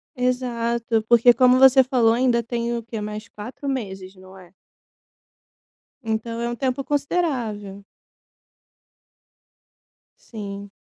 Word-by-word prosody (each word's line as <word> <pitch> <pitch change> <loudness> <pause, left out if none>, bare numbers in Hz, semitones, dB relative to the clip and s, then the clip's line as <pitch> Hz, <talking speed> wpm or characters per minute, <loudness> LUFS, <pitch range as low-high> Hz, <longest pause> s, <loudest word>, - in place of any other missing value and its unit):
Exato 235 -3 -1
porque 240 +1 +6
como 255 0 +4
você 265 0 +7
falou 245 -3 +2
ainda 240 0 +2
tem 235 0 -3
o 235 - -5
quê 225 -1 -6
mais 210 +1 -6
4 245 +7 -9
meses, 195 -7 -5
não 185 +1 -15
é? 180 -2 -16 1.5
Então 225 +1 -3
é 235 - -2
um 240 - -4
tempo 260 +1 -2
considerável. 250 - -2 2.5
Sim. 200 -2 -7
235 Hz, 110 wpm, -22 LUFS, 210-255 Hz, 2.5 s, você